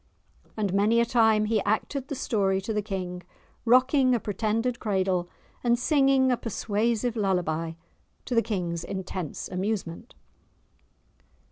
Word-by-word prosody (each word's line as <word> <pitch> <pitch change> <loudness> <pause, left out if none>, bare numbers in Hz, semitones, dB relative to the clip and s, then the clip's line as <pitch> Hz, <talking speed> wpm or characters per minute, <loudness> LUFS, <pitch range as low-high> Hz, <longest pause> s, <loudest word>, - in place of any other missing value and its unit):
And 205 -4 -1
many 210 +4 +3
a 235 - +4
time 220 -3 +3
he 215 -1 +1
acted 250 +7 -1
the 280 - -4
story 195 -6 0
to 220 +3 -3
the 210 - 0
King, 185 -3 -5 0.4
rocking 255 +2 +4
a - - 0
pretended 225 +4 -1
cradle, 190 -4 0 0.3
and 240 -1 +3
singing 270 -1 +3
a 250 - +2
persuasive 230 +2 -1
lullaby, 175 -6 -1 0.5
to - - -3
the 230 - +4
King's 175 -7 -3
intense 190 -4 -5
amusement. 190 +1 -4
215 Hz, 130 wpm, -27 LUFS, 190-235 Hz, 0.5 s, a